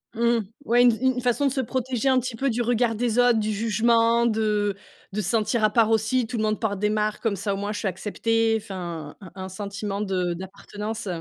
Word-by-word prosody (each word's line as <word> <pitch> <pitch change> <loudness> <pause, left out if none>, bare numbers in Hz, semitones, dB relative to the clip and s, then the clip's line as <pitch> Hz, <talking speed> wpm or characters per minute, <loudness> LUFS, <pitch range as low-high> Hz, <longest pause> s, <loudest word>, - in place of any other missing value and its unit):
Mmh, 235 +1 +2 0.3
ouais, 240 -1 +4
une 245 0 +7
f 225 - -4
une 260 -1 +1
façon 250 +3 +1
de 275 - +2
se 265 - 0
protéger 260 +1 -1
un 260 -1 +4
petit 250 -1 -4
peu 275 +4 0
du 240 0 0
regard 235 -1 +1
des 235 +1 0
autres, 245 -2 +5
du 215 0 -1
jugement, 230 +2 +2
de 210 -3 +1 0.4
de 210 - -1
se 190 - -2
sentir 220 +1 +1
à 215 - +5
part 225 0 +3
aussi. 225 +3 +2
Tout 240 +1 -5
le 220 - 0
monde 215 0 0
porte 205 -4 -2
des 210 +1 +1
marques 215 0 -1
comme 225 -3 0
ça 200 +1 -2
au - - -3
moins, 205 +1 -3
je 205 - -4
suis - - -2
accepté. 225 +3 0
Enfin, 175 -7 -7
un 185 -4 -11
un 190 -1 -6
sentiment 200 +1 -4
de 185 -3 -1
d'appartenance. 205 +4 -6
220 Hz, 235 wpm, -24 LUFS, 205-235 Hz, 0.4 s, une